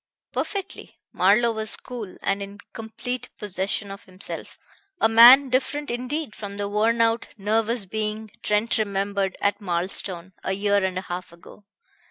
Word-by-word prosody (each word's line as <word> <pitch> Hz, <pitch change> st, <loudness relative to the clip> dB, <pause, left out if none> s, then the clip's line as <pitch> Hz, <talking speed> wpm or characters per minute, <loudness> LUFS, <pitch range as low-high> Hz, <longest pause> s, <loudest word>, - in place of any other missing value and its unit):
"Perfectly." 395 Hz, -2 st, -4 dB, 0.2 s
Marlowe 215 Hz, +6 st, +4 dB
was 220 Hz, -1 st, -4 dB
cool 230 Hz, -7 st, -8 dB
and 195 Hz, 0 st, 0 dB
in 200 Hz, +1 st, -7 dB, 0.2 s
complete 225 Hz, +3 st, -5 dB
possession 200 Hz, 0 st, -2 dB
of 195 Hz, -, -10 dB
himself, 185 Hz, +1 st, -8 dB, 0.4 s
a -, -, +5 dB
man 245 Hz, +5 st, +9 dB
different 275 Hz, +3 st, -1 dB
indeed 255 Hz, +2 st, -3 dB
from 200 Hz, -1 st, -7 dB
the 205 Hz, 0 st, -2 dB
worn 220 Hz, +3 st, +2 dB
out, 230 Hz, 0 st, +2 dB
nervous 220 Hz, +2 st, 0 dB
being 215 Hz, +1 st, -3 dB
Trent 210 Hz, +2 st, +1 dB
remembered 200 Hz, -2 st, -1 dB
at 200 Hz, +2 st, +1 dB
Marlstone 185 Hz, 0 st, 0 dB
a 190 Hz, -, -1 dB
year 200 Hz, 0 st, +1 dB
and 185 Hz, -1 st, -1 dB
a -, -, -1 dB
half 180 Hz, -1 st, -6 dB
ago. 170 Hz, +4 st, -16 dB
210 Hz, 150 wpm, -24 LUFS, 195-230 Hz, 0.4 s, man